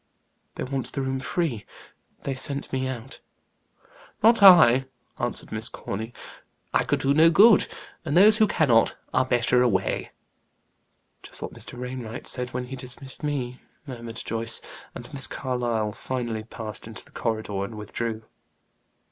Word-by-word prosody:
"They - - -4
want 135 -1 -3
the 135 - -3
room 130 0 -2
free; 130 - -2 0.6
they 140 - -2
sent 140 +2 -3
me 130 0 0
out." 130 +1 -7 1.0
"Not 230 0 +6
I," 160 -10 +8 0.3
answered 120 -1 -3
Miss 110 +2 -1
Corny. 110 +4 -5 0.6
"I - - +3
could - - 0
do 135 +1 +3
no 160 +3 +6
good; 210 +5 +6 0.4
and 160 0 0
those 210 +3 +7
who 215 -1 +5
cannot, 125 - +3 0.2
are 130 - +3
better 125 0 +2
away." 100 -6 0 1.1
"Just - - -7
what - - -6
Mr. - - -7
Wainwright 125 -2 -6
said 125 -1 -2
when 125 +1 -4
he 130 +2 -7
dismissed 130 +1 -8
me," 130 -4 -3 0.2
murmured 120 -4 -8
Joyce. 115 0 0 0.4
And 120 - -8
Miss 135 -1 +1
Carlyle 120 -5 -2
finally 120 -2 -4
passed 110 -1 -7
into 115 -1 -9
the - - -20
corridor 110 -4 -2
and 110 +3 -6
withdrew. 110 +1 -4
125 Hz, 150 wpm, -25 LUFS, 115-135 Hz, 1.1 s, I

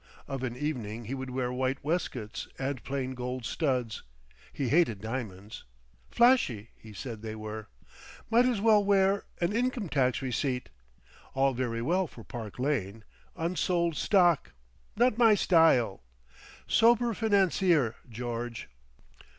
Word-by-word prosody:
Of 135 -2 -4
an 125 -2 -4
evening 120 -7 -4
he 120 - -5
would 130 -1 -5
wear 125 -1 -2
white 130 +1 -1
waistcoats 130 -9 -3
and 135 -1 -3
plain 135 -1 -3
gold 125 -1 -5
studs. 125 -7 -1 0.5
He 135 -4 -2
hated 145 - +3
diamonds. 110 -2 -6 0.5
"Flashy," 235 - +3
he 110 - -14
said 110 +1 -7
they 110 -1 -6
were. 110 0 -7 0.6
"Might 235 +2 +4
as 245 -5 +1
well 210 -1 +5
wear—an 195 -2 +1
income 240 -5 -1
tax 130 -4 +1
receipt. 125 0 -2 0.7
All 135 0 +3
very 120 -2 -2
well 180 +6 +1
for - - -13
Park 115 -5 -8
Lane. 115 -6 -2 0.3
Unsold 170 -1 0
stock. 175 - +3 0.4
Not 240 0 +2
my 225 -3 +6
style. 160 - +3 0.6
Sober 235 +1 +4
financier, 190 - +2 0.2
George." 120 - -5
130 Hz, 125 wpm, -29 LUFS, 115-180 Hz, 0.7 s, my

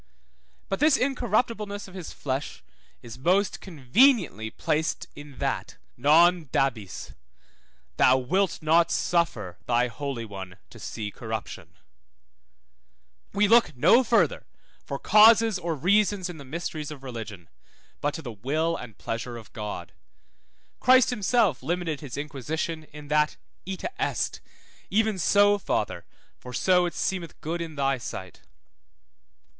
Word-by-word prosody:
But 195 - -2
this 300 -1 +5
incorruptibleness 225 -5 -1
of 190 - -14
his 185 -4 -7
flesh 135 +1 -4 0.4
is 120 +1 -10
most 185 +8 +1
conveniently 170 - +2
placed 155 +7 -1
in 145 -2 -12
that; - - -3 0.2
Non 165 +6 +4
dabis, 115 -8 -2 0.8
thou 130 - +5
wilt 180 +9 0
not 165 +2 +4
suffer 170 - -1
thy 120 0 +2
Holy 135 -3 -5
One 95 -4 -8
to - - -13
see 105 -2 -5
corruption; - - -7 1.6
we 205 +1 +3
look 225 - +4
no 185 - +6
further 245 - +1 0.4
for - - -4
causes 220 -1 +6
or 170 -2 -2
reasons 190 +3 +2
in 160 - -11
the 140 - -10
mysteries 155 +1 -5
of 145 -3 -9
religion, 110 -8 -7 0.5
but 145 0 -1
to 160 - -7
the 120 - -6
will 155 +10 -1
and 110 -9 -9
pleasure 120 +1 -5
of 115 - -13
God; 105 -1 -6 0.9
Christ 255 0 +5
himself 210 - +1
limited 170 -3 -2
his 140 -4 -7
inquisition 155 +3 -4
in 150 -1 -12
that 150 0 +2 0.3
ita 195 - -4
est, - - -1 0.5
even 215 -1 +1
so, 205 +3 +4
Father, - - -2 0.3
for 125 - -10
so 180 +4 +3
it 175 - -7
seemeth 180 -4 -3
good 170 +2 -3
in 165 -2 -6
thy 135 -2 0
sight. 95 -6 -8
160 Hz, 130 wpm, -26 LUFS, 130-200 Hz, 1.6 s, no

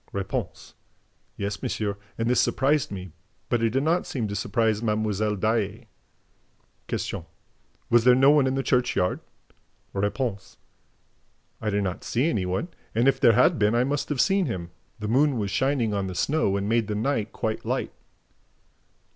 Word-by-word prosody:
R. 100 -1 -1 1.1
"Yes, 100 0 -3
monsieur, 105 -2 -2 0.2
and 115 - -1
this 125 - +3
surprised 140 +1 +1
me, 95 -3 -7 0.4
but 120 - +2
did 115 +4 +1
not 170 +3 +1
seem 120 -5 -2
to 100 - -4
surprise 110 +1 0
Mlle. 105 -1 0
Daae." 110 +2 -1 1.0
Q. 85 - -4 0.6
"Was 120 -1 +5
there 125 0 +6
no 135 +2 +6
one 145 -3 +4
in 130 - 0
the 135 - -1
churchyard?" 125 -9 +1 0.7
R. 100 - -1 1.6
"I 110 - 0
did 100 0 0
not 90 -2 -3
see 125 +6 0
any 95 -4 -1
one; 95 - -2 0.3
and, 120 +3 +3
if 135 - +3
there 115 - +6
had 125 0 +4
been, 105 +2 +3
I 120 - +3
must 140 +2 -2
have 145 -4 -2
seen 195 +1 +3
him. 85 -7 -5 0.3
The 105 - -5
moon 135 +4 +3
was 100 -3 -2
shining 130 -4 +1
on 100 -1 -1
the 95 - -6
snow 140 - +1
and 100 0 -2
made 115 -1 +1
the 105 - -2
night 115 -1 -1
quite 110 -1 -3
light." - - -2
115 Hz, 165 wpm, -25 LUFS, 100-130 Hz, 1.6 s, there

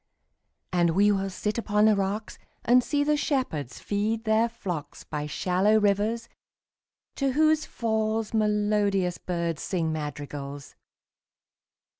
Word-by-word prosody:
And 170 -2 +2
we 205 +2 +5
will 195 -1 0
sit 210 +4 -2
upon 210 -2 +2
the 215 -1 +5
rocks, 200 +2 -2
5 - - -31 0.2
And 250 +1 +5
see 290 +2 +1
the 300 +1 +2
shepherds 255 - -2
feed 215 +2 -1
their 220 +1 +2
flocks 180 -9 -6
By 150 0 -4
shallow 190 +7 +2
rivers, 210 +3 +1 0.9
to 275 -2 +1
whose 310 +1 +3
falls 220 -1 -1
Melodious 210 -4 +1
birds 170 -3 -2
sing 165 -4 -1
madrigals. 145 -2 -6
205 Hz, 125 wpm, -27 LUFS, 175-225 Hz, 0.9 s, we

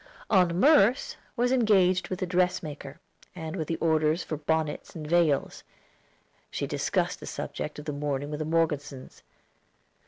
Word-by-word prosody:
Aunt 180 -4 +4
Merce 285 - +4 0.2
was 245 0 +1
engaged 195 -7 +3
with 185 0 -3
a - - +1
dressmaker, 175 -5 -2 0.4
and 160 -1 -5
with 160 -5 -3
the 165 - -1
orders 160 0 +1
for 155 - -4
bonnets 155 0 -2
and 155 -2 -6
veils. 155 -3 +1 0.9
She - - -3
discussed - - -1
the - - -9
subject 150 - -5
of 150 - -8
the 150 - -3
mourning 145 0 -3
with 150 - -4
the 155 - -2
Morgesons. 150 -5 -2
165 Hz, 150 wpm, -27 LUFS, 150-185 Hz, 0.9 s, Aunt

